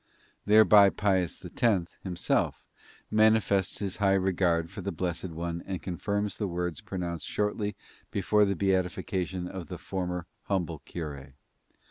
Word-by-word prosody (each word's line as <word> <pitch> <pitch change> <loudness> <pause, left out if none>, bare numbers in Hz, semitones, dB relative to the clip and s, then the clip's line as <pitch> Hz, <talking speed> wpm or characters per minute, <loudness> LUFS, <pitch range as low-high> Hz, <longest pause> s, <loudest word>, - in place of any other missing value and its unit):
Thereby 105 -1 +8
Pius 95 -4 0
X, 100 -8 0
himself, 90 -3 0 0.5
manifests 110 -3 +3
his 100 0 -3
high 95 -2 +3
regard 90 -3 +1
for 100 - -7
the 100 +2 -3
blessed 90 +1 -3
one 85 +1 -4
and 95 -2 -3
confirms 100 +4 -2
the 105 - 0
words 90 -3 -3
pronounced 85 -4 -4
shortly 105 -1 -1 0.3
before 105 +2 +3
the 100 0 0
beatification 95 -1 -1
of 90 -3 -7
the - - -6
former 90 -2 -3 0.2
humble 85 -5 -1
cure. 70 -5 -7
95 Hz, 130 wpm, -29 LUFS, 85-100 Hz, 0.5 s, Thereby